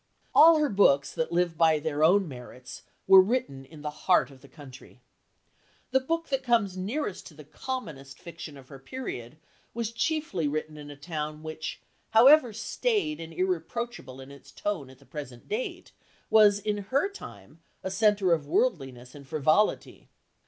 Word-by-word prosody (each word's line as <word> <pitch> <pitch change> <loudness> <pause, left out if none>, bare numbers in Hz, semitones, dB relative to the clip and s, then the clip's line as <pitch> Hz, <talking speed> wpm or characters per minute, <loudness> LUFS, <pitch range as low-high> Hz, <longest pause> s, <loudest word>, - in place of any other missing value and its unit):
All 325 +1 +8
her 300 -2 +1
books 140 -9 +3
that 245 - -2
live 170 -1 0
by 160 -2 +5
their 150 0 -2
own 190 +4 +4
merits 125 -1 -10 0.2
were 190 0 +9
written 185 - -2
in 150 +2 -14
the 150 - -3 0.2
heart 175 -7 +4
of 130 -1 -17
the 140 - -15
country. 135 -2 -14 0.9
The 265 - +4
book 330 +5 -3
that 270 -1 0
comes 230 -7 +1
nearest 205 +4 -4
to 155 - -15
the 150 - -12
commonest 150 - -7
fiction 165 -4 -10
of 130 -2 -16
her 135 - -11
period 135 - -7 0.4
was 230 -1 -3
chiefly 295 - -1
written 155 +1 -4
in 145 -1 -10
a 145 - -9
town 150 0 -6
which, 155 0 -6 0.3
however 255 +3 +7
staid 325 - -1
and 165 0 -8
irreproachable 185 - -4
in 135 +1 -12
its 140 - -15
tone 180 -11 -4
at 130 - -16
the 140 - -22
present 130 -6 -9
date, 220 +5 -5 0.4
was 210 -2 +6
in 205 0 -2
her 275 - +1
time 150 - -12 0.2
a 190 - -3
centre 200 -3 +3
of 155 -3 -2
worldliness 135 - -1
and 140 -2 -13
frivolity. 155 +8 0
170 Hz, 165 wpm, -27 LUFS, 145-225 Hz, 0.9 s, were